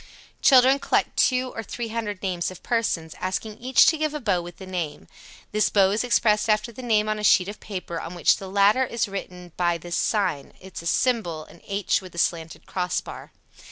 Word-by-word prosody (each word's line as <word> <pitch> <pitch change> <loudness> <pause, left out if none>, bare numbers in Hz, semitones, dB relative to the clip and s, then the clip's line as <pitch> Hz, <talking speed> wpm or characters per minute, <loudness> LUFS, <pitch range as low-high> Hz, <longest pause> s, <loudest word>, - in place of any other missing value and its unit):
Children 265 0 +6
collect - - 0
two 255 0 +2
or 225 - -4
three 230 +1 -6
hundred 215 -4 -4
names 180 -3 -1
of 185 - -12
persons, 185 -9 -1
asking 210 +3 -4
each 255 +1 +5
to 320 - +3
give 310 -1 -1
a - - -2
bow 200 -9 0
with 175 0 -10
the 190 - -9
name. 170 -6 -5 0.4
This 215 0 +2
bow 195 -2 +4
is 210 +4 0
expressed 220 -3 +2
after 215 +2 +1
the 235 - -10
name 215 -3 +1
on 215 0 -1
a - - -5
sheet 185 -3 +5
of 205 +1 -7
paper 180 -5 -6
on 165 +2 -7
which 175 - +3
the 195 - -8
latter 200 +6 +4
is 235 -3 -1
written 180 -3 -7
by 175 -1 +1
this 175 +1 -5
sign 195 -10 -1 0.2
[Symbol: 170 -3 -1 0.2
H 200 -1 0
with 180 -2 -9
slanted 165 -1 -2
cross 180 -1 -1
bar]. - - -10
200 Hz, 195 wpm, -24 LUFS, 180-230 Hz, 0.4 s, Children